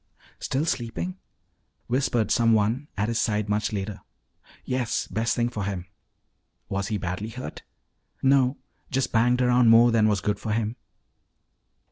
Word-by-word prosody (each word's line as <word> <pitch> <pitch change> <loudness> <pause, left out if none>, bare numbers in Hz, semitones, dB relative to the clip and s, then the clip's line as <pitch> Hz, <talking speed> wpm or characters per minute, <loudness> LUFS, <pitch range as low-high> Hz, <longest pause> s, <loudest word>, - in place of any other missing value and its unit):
" - - -28
still 140 +4 -1
sleeping?" 165 +7 -3 0.7
whispered 120 -3 0
someone 115 +3 +2
at 105 +1 0
his 115 0 -1
side 105 -2 0
much 105 +1 0
later. 100 -1 -4 0.6
"Yes, 125 -3 -1
best 115 +2 -1
thing 120 0 +1
for 110 -4 -4
him." 95 -3 -3 0.8
"Was 100 +1 -2
he 110 - -1
badly 95 +3 -4
hurt?" 125 +3 -7 0.6
"No, 135 0 +4 0.3
just 130 -1 0
banged 125 +2 +3
around 125 -1 +4
more 115 +1 +7
than 110 -2 +4
was 105 -2 +2
good 105 +4 -1
for 110 - -2
him." 110 0 -1
115 Hz, 145 wpm, -25 LUFS, 105-125 Hz, 0.8 s, more